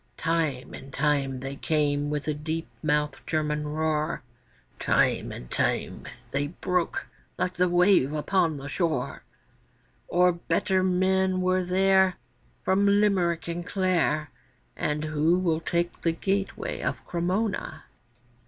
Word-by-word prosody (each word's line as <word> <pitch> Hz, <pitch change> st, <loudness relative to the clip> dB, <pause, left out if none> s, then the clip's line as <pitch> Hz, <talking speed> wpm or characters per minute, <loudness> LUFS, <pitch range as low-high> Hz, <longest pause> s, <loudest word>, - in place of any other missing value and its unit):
Time 160 Hz, -6 st, -1 dB
and 135 Hz, 0 st, -9 dB
time 140 Hz, -2 st, 0 dB
they 135 Hz, +1 st, -5 dB
came 145 Hz, -1 st, 0 dB
with 150 Hz, -1 st, -2 dB
the 155 Hz, -, 0 dB
deep 160 Hz, +2 st, -4 dB
mouthed 150 Hz, -1 st, 0 dB
German 150 Hz, -1 st, -1 dB
roar, 155 Hz, -1 st, -1 dB, 0.6 s
Time -, -, +2 dB
and -, -, -9 dB
time -, -, -1 dB, 0.2 s
they 145 Hz, +1 st, 0 dB
broke 180 Hz, +2 st, -1 dB, 0.3 s
like 185 Hz, -, -1 dB
the 180 Hz, 0 st, +2 dB
wave 175 Hz, -5 st, +4 dB
upon 160 Hz, +1 st, +1 dB
the 140 Hz, +1 st, -7 dB
shore; 165 Hz, +2 st, -1 dB, 0.9 s
For 180 Hz, +1 st, +4 dB
better 175 Hz, +2 st, 0 dB
men 185 Hz, 0 st, +2 dB
were 185 Hz, 0 st, +2 dB
there 190 Hz, 0 st, +3 dB, 0.5 s
From 195 Hz, +2 st, +3 dB
Limerick 195 Hz, -5 st, +2 dB
and 170 Hz, +1 st, -3 dB
Clare, 175 Hz, -5 st, 0 dB, 0.4 s
And 150 Hz, 0 st, -1 dB
who 155 Hz, +3 st, +2 dB
will 165 Hz, -3 st, +1 dB
take 170 Hz, +1 st, -1 dB
the 165 Hz, -, +1 dB
gateway 195 Hz, +3 st, -2 dB
of -, -, -3 dB
Cremona? 185 Hz, +5 st, -2 dB
165 Hz, 125 wpm, -27 LUFS, 150-185 Hz, 0.9 s, wave